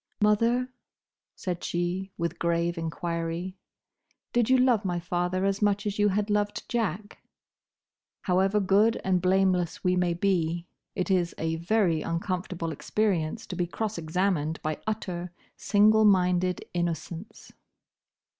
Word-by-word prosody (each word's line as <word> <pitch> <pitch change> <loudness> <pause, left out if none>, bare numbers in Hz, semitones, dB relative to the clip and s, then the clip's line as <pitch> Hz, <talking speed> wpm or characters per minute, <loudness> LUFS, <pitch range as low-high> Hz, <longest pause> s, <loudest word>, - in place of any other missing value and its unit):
"Mother," 230 +4 +2 0.7
said 180 -2 -4
she, 175 +3 -2
with 170 0 -3
grave 170 0 0
enquiry, 170 +2 -3 0.8
"did 240 -1 +2
you 260 - +6
love 250 -4 +3
my 175 -2 -1
father 180 +2 -1
as 195 +1 0
much 205 0 +2
as 205 0 -2
you 205 0 +4
had 205 +2 0
loved 205 0 -1
Jack?" 210 -3 -2 1.0
However 190 +3 +2
good 205 +4 +3
and 185 -2 +1
blameless 185 -2 +1
we 180 0 +2
may 180 -1 +1
be, 170 -2 0 0.3
it 185 +1 -1
is 175 -2 +1
a 165 0 -1
very 170 -2 +1
uncomfortable 170 -1 -3
experience 200 +1 -1
to - - -6
be 175 -1 -1
cross 215 +1 -3
examined 165 -1 0
by 155 0 -3
utter, 180 -5 -3 0.3
single 215 +2 +4
minded 180 -2 +3
innocence. 170 +2 -4
185 Hz, 130 wpm, -27 LUFS, 170-205 Hz, 1.0 s, you